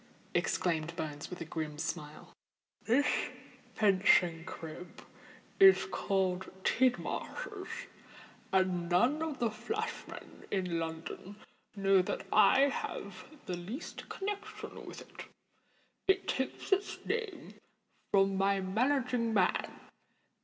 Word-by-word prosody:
exclaimed 165 Hz, -1 st, 0 dB
Bones, 145 Hz, -3 st, -5 dB
with 180 Hz, -, -7 dB
a -, -, -3 dB
grim 155 Hz, -1 st, -4 dB
smile. 150 Hz, 0 st, -5 dB, 0.5 s
"This 260 Hz, +6 st, +3 dB, 0.7 s
fencing 185 Hz, -5 st, +4 dB
crib 170 Hz, -1 st, -8 dB, 0.6 s
is 385 Hz, -1 st, +8 dB
called 190 Hz, -2 st, 0 dB
Tidmarsh's—and 250 Hz, -, -2 dB
none 240 Hz, -, +3 dB
of 315 Hz, -4 st, -2 dB
the 235 Hz, -2 st, +1 dB
flash 435 Hz, -, -3 dB
men -, -, -11 dB
in 180 Hz, -4 st, 0 dB
London 165 Hz, +4 st, -5 dB, 0.4 s
know 195 Hz, -1 st, +4 dB
that 180 Hz, -, -3 dB
I 215 Hz, +5 st, +7 dB
have 280 Hz, 0 st, -2 dB, 0.2 s
the 180 Hz, -, -2 dB
least 205 Hz, -, -7 dB
connexion 415 Hz, +2 st, -5 dB
with -, -, -8 dB
it. -, -, -10 dB, 0.8 s
It 385 Hz, 0 st, +3 dB
takes 265 Hz, +9 st, -2 dB
its 390 Hz, +1 st, +2 dB
name 450 Hz, -4 st, -3 dB, 0.6 s
from 195 Hz, 0 st, +4 dB
my 195 Hz, 0 st, +3 dB
managing 235 Hz, +3 st, +1 dB
man. 185 Hz, -3 st, +1 dB
195 Hz, 105 wpm, -32 LUFS, 180-285 Hz, 0.8 s, is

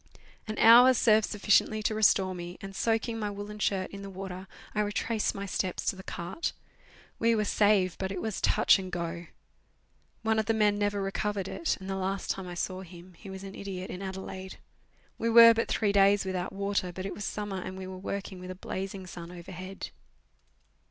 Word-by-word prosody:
An 215 Hz, 0 st, -4 dB
hour 245 Hz, +3 st, +8 dB
served 220 Hz, -2 st, +4 dB
sufficiently 210 Hz, +1 st, +2 dB
to 215 Hz, -, +1 dB
restore 200 Hz, -3 st, +3 dB
me, 175 Hz, 0 st, -7 dB
and, 195 Hz, 0 st, -8 dB
soaking 225 Hz, +1 st, 0 dB
my 210 Hz, -1 st, -2 dB
woollen 205 Hz, +1 st, -7 dB
shirt 190 Hz, -2 st, 0 dB
in 200 Hz, -, -8 dB
the 200 Hz, -, -7 dB
water, 190 Hz, 0 st, -7 dB, 0.3 s
I 210 Hz, -, +1 dB
retraced 210 Hz, +1 st, -1 dB
my 200 Hz, -, -4 dB
steps 185 Hz, -1 st, -2 dB
to -, -, +1 dB
the 190 Hz, -, -9 dB
cart. 175 Hz, -, -4 dB, 0.7 s
We 230 Hz, 0 st, +3 dB
were 215 Hz, -1 st, +1 dB
saved, 205 Hz, -4 st, +3 dB
but 190 Hz, 0 st, -2 dB
it 190 Hz, -, -3 dB
was 220 Hz, +1 st, -3 dB
touch -, -, +4 dB
and 185 Hz, -1 st, -6 dB
go. 170 Hz, -1 st, -4 dB, 1.0 s
One 220 Hz, 0 st, +2 dB
of 215 Hz, -, -1 dB
the 225 Hz, -, +2 dB
men 210 Hz, -1 st, +3 dB
never 205 Hz, -1 st, 0 dB
recovered 195 Hz, 0 st, -2 dB
it, 330 Hz, -, -1 dB
and 190 Hz, -, -9 dB
the 195 Hz, -, -2 dB
last 190 Hz, +1 st, -2 dB
time 190 Hz, -1 st, -5 dB
I 175 Hz, -, -6 dB
saw 185 Hz, +2 st, -3 dB
him 180 Hz, 0 st, -12 dB
he 195 Hz, -, -11 dB
was 190 Hz, 0 st, -8 dB
nu 195 Hz, 0 st, -8 dB
idiot 190 Hz, -2 st, -6 dB
in 180 Hz, -, -6 dB
Adelaide. 190 Hz, 0 st, -6 dB, 0.6 s
We 230 Hz, -, 0 dB
were 230 Hz, 0 st, +10 dB
but 230 Hz, 0 st, -1 dB
three 210 Hz, -2 st, +1 dB
days 200 Hz, 0 st, +4 dB
without 185 Hz, -1 st, -2 dB
water, 200 Hz, -2 st, -1 dB
but 185 Hz, +2 st, -6 dB
it 195 Hz, -, -3 dB
was 205 Hz, -, -6 dB
summer, 200 Hz, -2 st, -3 dB
and 185 Hz, +1 st, -6 dB
we 190 Hz, -, -6 dB
were 185 Hz, 0 st, -7 dB
working 195 Hz, 0 st, -5 dB
with 180 Hz, 0 st, -8 dB
a 185 Hz, -, -5 dB
blazing 190 Hz, +1 st, -5 dB
sun 170 Hz, -1 st, -9 dB
overhead. 185 Hz, +2 st, -8 dB
195 Hz, 205 wpm, -29 LUFS, 185-210 Hz, 1.0 s, were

